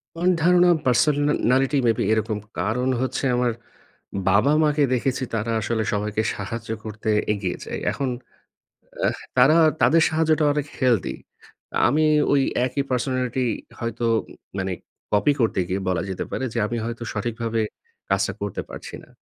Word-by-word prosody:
আমার 175 +2 +1
ধারণা 180 +1 +5 0.2
personality 135 0 +2
may 115 - +5
be - - 0
এরকম, 110 -1 0 0.2
কারণ 125 +5 0
হচ্ছে 130 +1 -2
আমার 125 -1 +2 0.8
বাবা-মাকে 145 +8 +3
দেখেছি 130 +1 0
তারা 115 +1 -1
আসলে 110 +1 -1
সবাইকে 105 +1 -1
সাহায্য 115 +3 -6 0.2
করতে 110 0 -4 0.2
এগিয়ে 100 -4 -3
যায়। - - -4
এখন 135 -2 -2 1.0
আহ - - 0 0.2
তারা 135 +6 +6 0.3
তাদের 165 +1 +5
সাহায্যটা 155 -1 +2
অনেক 145 -1 -2
হেলদি। 120 -7 +1 0.7
আমি 155 +2 +2 0.3
ওই 140 -1 +4 0.2
একই 140 +2 -1
পার্সোনালিটি 130 0 0 0.3
হয়তো 115 0 -3 0.2
উ - - -15 0.2
মানে 95 0 -1 0.4
কপি 105 +8 +4
করতে 110 -4 +2
গিয়ে 95 +2 -1
বলা 90 -2 0
যেতে 95 - -3
পারে 130 - -2
যে, - - -1
আমি 120 +2 -3
হয়তো 115 +1 -5
সঠিকভাবে 115 +1 -2 0.5
কাজটা - - +1
করতে - - -3
পারছি - - -8
না। - - -23
125 Hz, 145 wpm, -23 LUFS, 110-145 Hz, 1.0 s, তারা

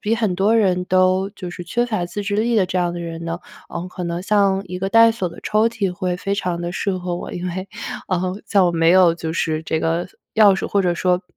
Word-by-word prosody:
比 215 +2 +1
很 215 -5 0
多 205 +5 +3
人 185 -4 +2
都 185 +1 +2
就 190 -4 -8
是 175 - -7
缺 240 +8 0
乏 215 -7 -1
自 205 +4 -5
制 205 0 -1
力 230 +2 +1
的 190 - +3
这 180 - -3
样 175 -1 0
的 175 - -5
人 165 -1 -6
呢， 165 0 -3 0.3
呃， 170 +1 -5
可 180 - -7
能 170 0 -3
像 200 -1 +2
一 180 0 -5
个 195 - -1
带 230 +2 +6
锁 205 -6 -2
的 170 - -13
抽 215 +2 +2
屉 205 -5 -2
会 180 -1 -2
非 195 +2 -2
常 180 -3 -2
地 175 0 -3
适 190 +1 -1
合 180 -1 -3
我。 - - -7
因 175 +1 -4
为， 185 +2 -4 0.4
呃， 185 0 -1
在 200 - +2
我 175 - +3
没 165 0 +3
有 180 -2 +6
就 165 -1 -4
是 160 -1 -1
这 160 - -1
个 165 +2 0 0.3
钥 215 -2 +7
匙， - - -3
或 200 - +1
者 175 -2 +1
说， 180 +1 +1
185 Hz, 275 characters per minute, -20 LUFS, 175-200 Hz, 0.4 s, 钥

